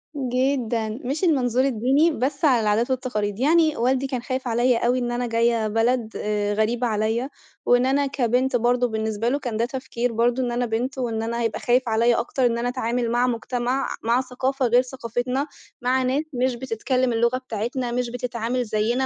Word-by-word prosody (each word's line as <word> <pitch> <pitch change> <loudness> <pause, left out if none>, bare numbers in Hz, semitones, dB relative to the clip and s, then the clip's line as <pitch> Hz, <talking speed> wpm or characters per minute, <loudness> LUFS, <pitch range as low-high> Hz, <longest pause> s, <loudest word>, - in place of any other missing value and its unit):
جدًا، 250 -4 0 0.2
مش 285 +8 -2
المنظور 260 -6 +2
الديني، 270 +6 +2
بس 280 +3 -1
على 250 -5 +4
العادات 215 +4 +1
والتقاليد. 215 -5 -2
يعني 310 +2 +3
والدي 260 +3 +1
كان 255 -3 -3
خايف 255 0 -3
عليَّ 240 +1 +2
أوي 245 +2 +1
إن 240 -1 -2
أنا 245 0 -1
جاية 230 -1 +1
بلد 225 +1 +1
آآ، 205 -1 -1
غريبة 230 +3 0
عليَّ، 220 +4 -1 0.4
وإن 245 +1 +4
أنا 280 +2 +2
كبنت 255 -1 0
برضه، 245 +1 +2
بالنسبة 220 0 -1
له 285 +3 0
كان 235 -5 -4
ده 230 - +1
تفكير 245 -2 -3
برضه، 240 +3 +1
إن 240 - -1
أنا 245 +1 0
بنت 245 +4 -2
وإن 225 -3 -2
أنا 235 +1 -2
هيبقى 225 -1 -1
خايف 250 +2 +2
عليَّ 230 +2 +3
أكتر 255 +1 0
إن 235 -1 +2
أنا 245 +1 -1
أتعامل 240 -1 -1
مع 245 +1 +2
مجتمع، 245 +2 -1 0.2
مع 235 +3 +2
ثقافة 260 +1 -2
غير 245 +2 +5
ثقافتنا، 255 +2 -3 0.3
مع 255 +1 +1
ناس 270 +4 0
مش 250 0 0
بتتكلم 255 +1 -1
اللغة 235 +2 +2
بتاعتنا، 240 +1 -3
مش 245 0 -1
بتتعامل 245 0 -2
زيّنا، 225 +4 0
245 Hz, 185 wpm, -23 LUFS, 230-260 Hz, 0.4 s, غير